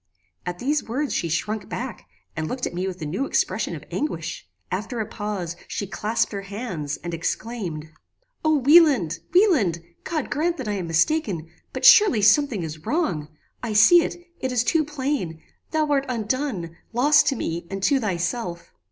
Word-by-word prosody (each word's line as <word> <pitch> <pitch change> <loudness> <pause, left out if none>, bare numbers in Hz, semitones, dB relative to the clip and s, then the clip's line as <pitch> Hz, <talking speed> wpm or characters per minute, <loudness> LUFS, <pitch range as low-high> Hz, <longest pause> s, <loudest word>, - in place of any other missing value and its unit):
At 175 0 -3
these 285 +8 0
words 265 +6 -2
she 170 - -1
shrunk 210 +7 -2
back, 250 -1 -6 0.3
and 160 -1 -2
looked 250 +5 -3
at - - -4
me 180 +2 -2
with 185 -1 -5
a - - -3
new 190 - -2
expression - - 0
of - - -9
anguish. 165 - -3 0.2
After 215 +6 -3
a 220 - -1
pause, 205 -5 -4
she 200 - -3
clasped 215 +5 -1
her 200 -2 -4
hands, 195 - -5
and 170 -1 -4
exclaimed 165 -3 -4 0.5
"O 310 -1 +3
Wieland! 275 - +5
Wieland! 285 - +3 0.2
God 310 -4 -3
grant 335 +4 0
that 260 - -5
I - - 0
am 185 -4 -3
mistaken; 165 - 0 0.2
but - - -3
surely 405 - +7
something 220 - +4
is 155 -1 -7
wrong. 180 - -1 0.3
I 230 -3 -3
see 340 +12 +7
it: - - -3 0.2
it 260 - -2
is 245 -2 +2
too 310 +6 +2
plain: 275 - -3 0.3
thou 315 -1 +1
art 275 -1 +2
undone 220 - -2 0.2
lost 295 +6 +5
to 275 - +2
me 170 -6 -4
and 195 0 -5
to 275 +5 +3
thyself." 175 -2 -3
215 Hz, 175 wpm, -24 LUFS, 175-280 Hz, 0.5 s, surely